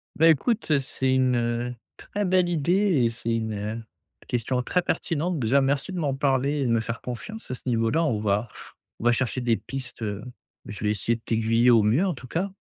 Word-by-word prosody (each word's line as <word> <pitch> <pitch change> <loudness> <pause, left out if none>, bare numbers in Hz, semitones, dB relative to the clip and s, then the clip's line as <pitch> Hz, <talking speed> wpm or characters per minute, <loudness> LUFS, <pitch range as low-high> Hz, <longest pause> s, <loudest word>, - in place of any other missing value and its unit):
Ben, 165 +1 +5
écoute, 160 - +1
c'est 130 -1 -1
une 125 -2 +1 0.2
très 205 0 -3
belle 185 -1 +3
idée 175 -2 +2
et 115 - +3
c'est 115 0 -2
une 110 0 -3 0.4
question 125 +1 -1
très 180 +7 +1
pertinente, 165 -1 -1
déjà, 130 +4 +3
merci 140 +5 0
de 180 - -3
m'en 145 -4 0
parler 140 +1 +1
et 135 - 0
de - - 0
me 115 - +3
faire 115 +1 -4
confiance 125 - -7
à - - -1
ce - - -5
niveau-là. 115 +7 +2
On 120 -9 0
va 105 +2 0 0.5
on - - -8
va 120 - +6
chercher 130 +1 0
des 120 -2 +2
pistes, 130 -3 -8
heu, 105 -1 -3 0.4
je 105 0 -7
vais 105 - +2
essayer 105 +3 0
de - - -23
t'aiguiller 115 +2 +2
au 115 -3 +6
mieux, 115 - +3
en 185 - 0
tout 125 - -11
cas 180 +9 -1
125 Hz, 210 wpm, -25 LUFS, 115-150 Hz, 0.5 s, va